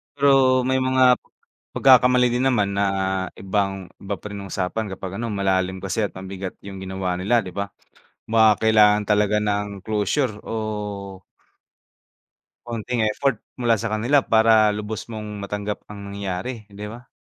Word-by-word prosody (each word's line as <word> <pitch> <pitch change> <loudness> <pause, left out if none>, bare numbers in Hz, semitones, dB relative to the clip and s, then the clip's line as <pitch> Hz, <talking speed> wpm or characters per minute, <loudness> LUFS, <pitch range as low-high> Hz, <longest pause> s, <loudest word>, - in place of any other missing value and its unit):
Pero 135 -2 +4
may 130 0 +2
mga, 130 -1 +4 0.6
pagkakamali 125 -1 +5
din 125 +2 0
naman 105 -6 +2
na 100 - +2 0.5
ibang 95 -1 -2
iba 100 +1 -3
pa - - -23
rin 100 -1 -6
usapan 95 +4 -3
kapag 95 0 -6
ano 120 - -2
malalim 95 -1 0
kasi 105 +3 0
at - - -7
mabigat 95 0 -6
yung 95 -1 -8
ginawa 95 -1 -3
nila 115 +6 +2
'di 90 - -7
ba. 100 0 -3 0.6
Baka 110 -1 +4
kailangan 105 -1 +5
talaga 105 0 +2
ng 105 -1 -1 0.2
closure 110 +4 0
o 115 - -4 2.1
konting 120 +1 -3
effort 110 +3 0 0.2
mula 120 -2 +3
sa 110 +1 -3
kanila 120 +6 +2
para 110 -1 +5
lubos 105 +1 -5
mong 105 -2 -6
matanggap 105 +1 -4
ang 100 -1 -8
nangyayari, 100 +4 -5
hindi 100 +1 -8
ba? 120 +3 -11
105 Hz, 145 wpm, -23 LUFS, 100-120 Hz, 2.1 s, pagkakamali